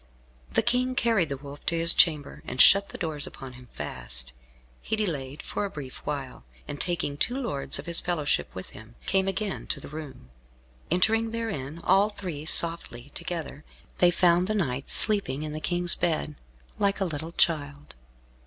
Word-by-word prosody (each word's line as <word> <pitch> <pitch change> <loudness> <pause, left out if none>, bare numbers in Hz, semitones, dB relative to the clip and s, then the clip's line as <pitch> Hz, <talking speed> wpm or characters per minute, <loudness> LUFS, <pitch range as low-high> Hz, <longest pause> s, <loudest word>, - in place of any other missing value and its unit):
The - - +2
King 250 +2 +1
carried 225 -9 +2
the 140 - -3
Wolf 140 +1 -11
to 170 - +2
his 165 +1 +6
chamber, 150 -4 +3
and 130 - -6
shut 200 +6 +8
the - - -8
doors 155 -4 -1
upon 130 -1 -9
him 125 0 -14
fast. - - -4 0.5
He - - -2
delayed 150 -10 -3
for - - -3
a 200 - -2
brief 145 -8 -8
while, 140 - -5 0.2
and 145 - -5
taking 170 -5 0
two 245 - -1
lords 145 - -1
of - - -6
his 170 -1 0
fellowship 165 -5 0
with 95 - -8
him, 110 +2 -13
came 190 0 +1
again 195 +1 -3
to - - -2
the - - -10
room. 145 - -9 0.6
Entering 220 +6 +2
therein, 170 -11 -4
all 195 +3 +4
three, 170 -7 -6
softly 145 -7 +1
together, 155 -4 -5 0.4
they 175 - +6
found 175 0 +3
the 215 - -1
knight 135 -9 -2
sleeping 200 -10 +4
in 150 -1 -5
the 155 - -5
King's 175 0 +4
bed, 155 -2 -1 0.5
like 200 -1 +1
a 195 - +1
little 160 0 -5
child. 145 -4 0
165 Hz, 175 wpm, -27 LUFS, 140-195 Hz, 0.6 s, shut